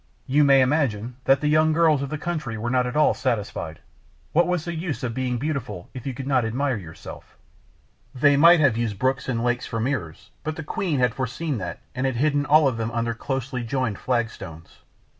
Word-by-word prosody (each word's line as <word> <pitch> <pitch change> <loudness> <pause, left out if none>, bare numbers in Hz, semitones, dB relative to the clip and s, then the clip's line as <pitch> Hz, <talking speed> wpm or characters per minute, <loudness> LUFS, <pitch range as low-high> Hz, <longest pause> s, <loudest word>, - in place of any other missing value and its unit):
You 145 +3 +3
may 135 -1 +6
imagine 125 -4 0
that 135 0 +4
the 150 - 0
young 155 +1 +4
girls 160 -3 +3
of 140 - -3
the 155 - -3
country 150 -8 -4
were 120 +2 -3
not 125 -1 +2
at 125 - -5
all 150 - +4
satisfied. 105 - -3 0.5
What 170 +3 +4
was 180 -3 -1
the 170 - -3
use 160 -4 -4
of 120 -2 -2
being 125 0 -1
beautiful 140 - -4
if 130 0 -7
you 130 - -3
could 135 - -6
not 130 -3 +2
admire 130 +4 0
yourself? 80 -5 -11 0.8
They 145 +2 +4
might 170 +4 +7
have 135 -7 +4
used 115 -3 -1
the - - -18
brooks 130 +3 0
and 115 -2 -1
lakes 120 0 0
for 115 - -3
mirrors; 110 - -3
but 155 0 -3
the 160 - -6
queen 155 0 -2
had 125 -2 +2
foreseen 130 +2 -3
that, 85 -3 -6
and 130 +1 -1
had 130 - -2
hidden 145 +3 +1
all 150 0 +6
of 130 -4 -1
them 115 0 -2
under 115 0 -1
closely 130 +1 -3
joined 115 -3 -2
flagstones. 110 -10 -4
130 Hz, 215 wpm, -24 LUFS, 115-150 Hz, 0.8 s, might